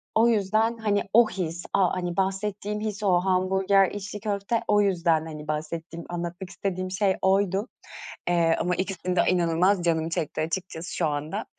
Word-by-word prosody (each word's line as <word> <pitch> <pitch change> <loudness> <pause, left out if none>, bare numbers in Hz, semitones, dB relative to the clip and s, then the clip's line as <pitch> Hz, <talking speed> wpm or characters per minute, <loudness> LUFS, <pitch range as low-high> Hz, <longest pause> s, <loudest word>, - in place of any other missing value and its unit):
O 225 +2 +5
yüzden, 220 +1 +2
hani, 210 -2 0
o 230 -1 +6
his. 175 -2 -4
A 185 -3 +3
hani, 175 -1 -3
bahsettiğim 200 +2 -1
his 210 -1 -4
o. 190 -3 +3
Hamburger, 190 +1 +2
içli 205 +1 -6
köfte. 210 +2 -1
O 205 0 +4
yüzden, 170 -5 +2
hani, 150 -1 -8
bahsettiğim, 160 +2 -4
anlatmak 175 +1 -5
istediğim 185 -1 -3
şey 195 -1 +1
oydu. 195 +3 +2 0.6
Eee, 170 -2 +3
ama 180 +2 +1
ikisini 185 -1 -3
de - - +5
inanılmaz 180 +2 +2
canım 165 -1 +1
çekti 165 -2 -3
açıkçası 165 0 -4
şu 165 - +1
anda. 150 +7 -3
185 Hz, 160 wpm, -26 LUFS, 170-200 Hz, 0.6 s, o